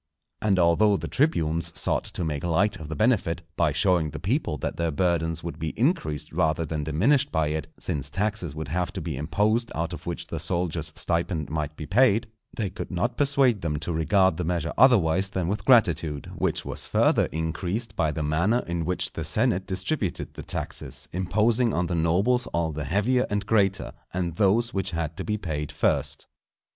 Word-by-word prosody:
And 105 -3 +2
although 90 +4 +4
the - - -5
tribunes 85 - 0
sought - - 0
to - - -4
make 75 -3 -3
light 95 +4 +1
of 80 -3 -9
the 80 - -3
benefit, 100 -7 +1
by 85 -3 +2
showing 80 +2 +2
the - - -7
people 95 - -1
that - - -3
their 85 0 0
burthens 80 0 0
would 85 - -6
be 80 -1 -4
increased 95 - 0
rather 80 -1 +1
than 75 -1 -3
diminished 130 - +2
by 75 -2 +1
it, 75 -1 -3
since 70 -2 -3
taxes 95 -2 -2
would 80 -3 -5
have 90 +3 -1
to 100 - -4
be 80 -3 -4
imposed 105 - 0
out 85 +1 -2
of 85 - -9
which 85 0 -3
the 80 -1 -5
soldier's 80 -1 -1
stipend 85 -3 -1
might 75 -1 -3
be 75 - -6
paid, 115 - +3 0.3
they 100 -4 -3
could - - -6
not 110 +7 -1
persuade 135 -6 +3
them 75 -3 -1
to 80 +3 -3
regard 95 +4 +3
the 90 - -2
measure 85 -1 -1
otherwise 95 -7 +4
than 95 -3 -2
with 105 +4 -2
gratitude; 85 - +3
which - - -1
was - - -5
further - - +3
increased 90 +8 -3
by 80 -2 +1
the 75 +1 -3
manner 85 +11 +1
in 85 -1 -2
which 90 +2 -1
the - - -4
senate 95 +1 +1
distributed 95 - -2
the - - -8
taxes, - - -6
imposing 110 +7 +2
on 90 - +1
the 85 - -3
nobles 90 +10 +2
all 85 -1 0
the 75 -1 -4
heavier 105 - +1
and 105 -1 -1
greater, 95 - +1 0.2
and 85 -3 -2
those 115 +4 +2
which 95 -2 -1
had 80 -1 -2
to - - -5
be 105 -1 -1
paid 75 -6 -4
first. - - 0
85 Hz, 195 wpm, -26 LUFS, 80-105 Hz, 0.3 s, although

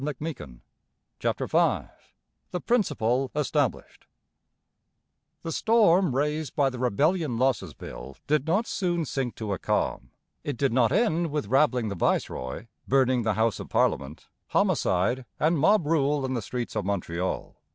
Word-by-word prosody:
CHAPTER - - -1
V - - +2 0.6
THE 180 - -3
PRINCIPLE 135 - +1
ESTABLISHED 150 -5 -1 1.4
The 165 - -3
storm 190 - +3
raised 150 +1 -1
by 140 -2 +2
the 125 - -7
Rebellion 140 - +1
Losses 115 - 0
Bill 65 +2 -9
did 150 0 +1
not 195 +8 +2
soon 175 -6 -1
sink 135 -4 -3
to 105 -3 -3
a 95 - -4
calm. 65 - -1 0.3
It 145 -4 -3
did 135 -2 +1
not 120 -2 +3
end 175 -7 +2
with 150 -5 -2
rabbling 130 -4 +3
the 100 - -4
viceroy, 75 - -1 0.2
burning 130 -2 +3
the 110 -2 0
House 110 0 +1
of - - -8
Parliament, 70 +3 0 0.2
homicide, 95 +9 +1 0.2
and 160 +1 +2
mob 190 +3 +4
rule 145 -2 +1
in 130 - -2
the 120 - -1
streets 120 +3 -5
of - - 0
Montreal. 90 -2 -3
135 Hz, 140 wpm, -26 LUFS, 110-155 Hz, 1.4 s, mob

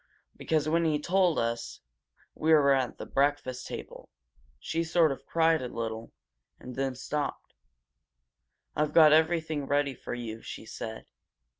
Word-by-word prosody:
Because 155 -2 0
when 165 +2 +2
he 155 -2 +2
told 180 +1 +2
us 115 0 -2 0.5
we 160 +1 0
were 140 -3 +6
at 130 -2 -1
the - - -7
breakfast 135 -2 0
table - - -8 0.5
she 165 - -2
sort 165 -1 +3
of 135 - -7
cried 165 -1 +3
a 125 - -3
little, 115 -1 -5 0.5
and 125 - -9
then 135 -1 -1
she 130 - -11
stopped. 150 -1 -4 1.2
"I've 150 0 0
got 155 -2 +8
everything 160 -2 +1
ready 145 -1 +1
for 120 - -6
you,' 115 -2 -6
she - - -8
said. 110 0 -7
145 Hz, 150 wpm, -29 LUFS, 125-160 Hz, 1.2 s, got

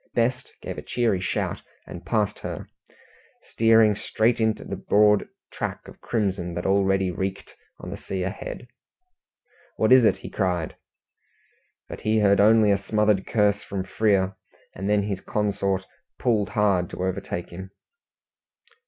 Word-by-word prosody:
Best 120 +1 0
gave - - -5
a - - -6
cheery 115 -7 0
shout 95 - -2 0.2
and 85 - -9
passed 105 +2 -1
her, - - -6 0.8
steering 110 -2 +4
straight 110 +2 0
into 110 -1 0
the - - -5
broad 105 0 +3 0.2
track - - -5
of - - -14
crimson 95 -6 -2
that 85 - -4
already 95 -1 +2
reeked 95 +2 -5 0.2
on - - -8
the - - -5
sea 95 -1 -4
ahead. 100 +5 -6 1.1
"What 110 - +2
is 130 -1 +8
it?" 110 - +4
he - - -9
cried. 90 -5 -1 1.1
But - - -8
he 110 +1 +1
heard 100 -2 +4
only 110 0 +5
a 100 - +2
smothered 105 -1 +1
curse 105 -2 +2
from 100 -2 -4
Frere, 95 -1 +1 0.4
and 95 +2 -4
then 105 -1 +3
his 100 -2 -3
consort 100 -2 -1 0.3
pulled 105 -5 +1
hard 100 -4 +1
to 90 - -5
overtake 90 -1 -3
him. 95 +2 -8
100 Hz, 145 wpm, -24 LUFS, 95-110 Hz, 1.1 s, is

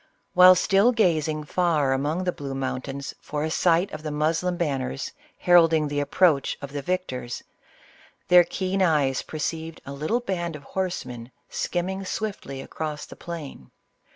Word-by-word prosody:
While 185 0 +9
still 195 +5 +4
gazing 160 -9 +1
far 150 -4 +1
among 150 +7 -1
the 180 - +1
blue 140 -4 -6
mountains 135 +1 -4
for 150 0 -3
a 160 - -2
sight 175 +2 +2
of 155 - -6
the 155 - -4
Moslem 165 +4 0
banners, 135 - -2 0.3
heralding 165 -3 +5
the 145 0 -2
approach 145 -1 +2
of 140 -1 -8
the 145 0 -4
victors, 135 -8 -3 0.8
their 180 0 +8
keen 190 +2 -2
eyes 145 -7 +2
perceived 160 +1 -4
a 140 - -6
little 155 - 0
band 175 -8 -3
of 145 - -10
horsemen 130 -10 -4 0.2
skimming 190 +2 -2
swiftly 185 -9 -4
across 150 +1 -5
the - - -12
plain. 155 - -8
160 Hz, 150 wpm, -25 LUFS, 140-180 Hz, 0.8 s, While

